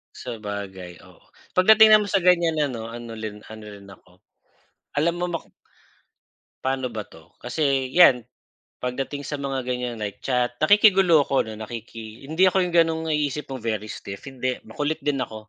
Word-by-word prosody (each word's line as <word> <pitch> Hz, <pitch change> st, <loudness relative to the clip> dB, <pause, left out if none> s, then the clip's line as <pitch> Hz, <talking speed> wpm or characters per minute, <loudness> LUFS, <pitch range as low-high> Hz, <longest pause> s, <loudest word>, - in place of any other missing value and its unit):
Sabagay, 100 Hz, -6 st, -7 dB
oo. -, -, -20 dB, 0.3 s
Pagdating 215 Hz, +3 st, +7 dB
naman 210 Hz, -1 st, +2 dB
sa 195 Hz, -, +3 dB
ganiyan 170 Hz, -3 st, +3 dB
ano, 120 Hz, -6 st, -2 dB
ano 120 Hz, -1 st, -8 dB
lin 110 Hz, -1 st, -6 dB
ano 110 Hz, 0 st, -10 dB
rin 100 Hz, -1 st, -12 dB
ako, 90 Hz, -1 st, -17 dB, 0.8 s
alam 160 Hz, +4 st, +2 dB
mo 180 Hz, -, -1 dB
maku 170 Hz, -2 st, -6 dB, 1.1 s
paano 130 Hz, -1 st, -2 dB
ba 110 Hz, -3 st, -6 dB
'to, 80 Hz, -, -18 dB
kasi 135 Hz, 0 st, 0 dB
'yan 130 Hz, -10 st, +6 dB, 0.5 s
pagdating 135 Hz, +3 st, -4 dB
sa 145 Hz, -, -4 dB
mga 135 Hz, -1 st, -2 dB
ganiyan, 125 Hz, -1 st, -3 dB
like 100 Hz, -1 st, -5 dB
chat, 125 Hz, -2 st, 0 dB
nakikigulo 195 Hz, -3 st, +6 dB
ako 135 Hz, -, +1 dB
'no, 110 Hz, 0 st, -9 dB
nakiki 115 Hz, +1 st, -9 dB
hindi 160 Hz, +6 st, +3 dB
ako 185 Hz, 0 st, +2 dB
yung 175 Hz, -, -4 dB
gano'ng 165 Hz, -1 st, +3 dB
naiisip 150 Hz, -1 st, -1 dB
mong 130 Hz, -, -5 dB
very 110 Hz, -2 st, -2 dB
stiff, 100 Hz, -1 st, -8 dB
hindi, 130 Hz, -2 st, -3 dB
makulit 145 Hz, +8 st, -3 dB
din 145 Hz, -2 st, 0 dB
ako. 110 Hz, -3 st, -6 dB
130 Hz, 165 wpm, -24 LUFS, 110-160 Hz, 1.1 s, Pagdating